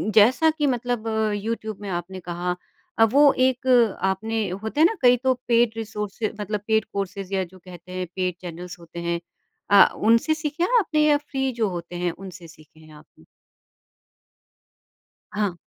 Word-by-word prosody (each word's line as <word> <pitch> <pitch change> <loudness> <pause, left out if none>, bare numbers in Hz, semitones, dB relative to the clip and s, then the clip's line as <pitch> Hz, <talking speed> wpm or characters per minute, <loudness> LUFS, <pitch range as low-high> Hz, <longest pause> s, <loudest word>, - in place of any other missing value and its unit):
जैसा 250 +9 +6
कि 295 -3 +1
मतलब 245 -2 -1 0.3
यूट्यूब 215 0 -4
में 200 - -6
आपने 180 +1 -4
कहा 175 0 -3 0.4
अ, - - +8
वो 280 +6 +6
एक 260 0 +1 0.4
आपने 215 +3 -1
होते 220 +9 -5
हैं 315 - +7
ना 450 - -3
कई 245 0 +6
तो 260 0 +4
पेड 235 -1 +3
रिसोर्सेज़ 210 0 -4
मतलब 210 0 -3
पेड 220 0 +2
कोर्सेज़ 195 0 -4
या 190 -1 +1
जो 185 - -14
कहते 180 0 -13
हैं 185 0 -3
पेड 185 -2 -1
चैनल्स 175 0 -8
होते 170 0 -10
हैं। 170 0 -2 0.5
अ, 200 -1 +9
उनसे 230 +8 +3
सीखे 310 +1 -3
हैं 485 +7 +3
आपने 305 -7 +1
या 295 -1 +5
फ्री 270 -2 -3
जो 215 - +2
होते 170 +1 -8
हैं 175 0 -1
उनसे 185 -1 -11
सीखे 155 -1 -18
हैं 155 -1 -16
आपने? 150 - -18 2.1
हाँ। 205 -4 -1
210 Hz, 170 wpm, -24 LUFS, 180-245 Hz, 2.1 s, अ